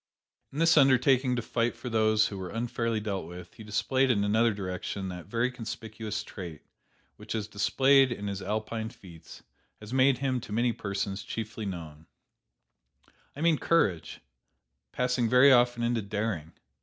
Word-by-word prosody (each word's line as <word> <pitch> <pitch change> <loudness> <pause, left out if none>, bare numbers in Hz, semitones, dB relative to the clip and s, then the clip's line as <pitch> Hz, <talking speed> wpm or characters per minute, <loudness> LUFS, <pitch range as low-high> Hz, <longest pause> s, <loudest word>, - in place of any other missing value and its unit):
"In 140 - -9
this 165 0 +4
undertaking 130 -2 +4
to 120 - -2
fight 115 0 -1
for 120 +2 -9
those 110 -2 +3
who 100 - -7
were 90 -1 -5
unfairly 115 0 -2
dealt 100 -5 -4
with, 90 0 -10
he 110 - -12
displayed 130 +6 +1
in 105 -5 +2
another 110 +3 +3
direction 95 -1 -4
that 90 -1 -8
very 120 +4 0
conspicuous 110 -3 -6
trait 85 -6 -9 0.5
which, - - -6
as 105 -2 -3
displayed 135 +6 +3
in 105 -4 -4
his 100 -1 -4
Alpine 110 +3 -3
feats, 85 -8 -14 0.4
has 105 +3 -9
made 130 0 +4
him 130 -2 -1
to 110 - -10
many 120 +2 +1
persons 100 -1 -3
chiefly 110 0 -5
known: 80 -4 -8 1.3
I 145 - -7
mean 165 -2 +3
courage, 100 - +1 0.7
passing 125 -2 0
very 125 +3 +7
often 120 -1 +4
into 120 -1 +1
daring. 100 -6 -3
110 Hz, 155 wpm, -28 LUFS, 100-125 Hz, 1.3 s, very